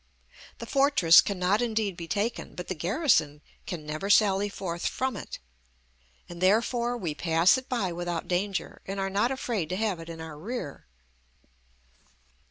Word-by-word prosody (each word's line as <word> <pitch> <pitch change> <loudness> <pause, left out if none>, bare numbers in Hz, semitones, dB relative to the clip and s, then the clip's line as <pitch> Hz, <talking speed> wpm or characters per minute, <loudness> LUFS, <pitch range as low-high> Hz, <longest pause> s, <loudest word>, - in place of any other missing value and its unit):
The - - -7
fortress 275 - +6
cannot 195 +2 0
indeed 220 -5 -1
be 170 -1 -7
taken, 210 +7 -2
but 180 - -7
the - - 0
garrison 170 - +1 0.3
can 165 -5 -5
never 155 +6 -4
sally 205 -1 +4
forth 175 -4 -4
from 260 -2 -2
it, - - -7 0.9
and 175 0 -10
therefore 235 +5 +2
we 175 -9 -3
pass 165 +4 +3
it 260 -1 -6
by 220 -8 -1
without 175 -1 -4
danger, 190 +2 -2
and 195 +1 -4
are 195 0 -1
not 205 +5 +2
afraid 235 -10 -2
to 185 - -2
have 205 -3 -1
it 165 0 -9
in 165 -1 -8
our 160 -2 -8
rear. 200 - -6
195 Hz, 160 wpm, -27 LUFS, 170-220 Hz, 0.9 s, fortress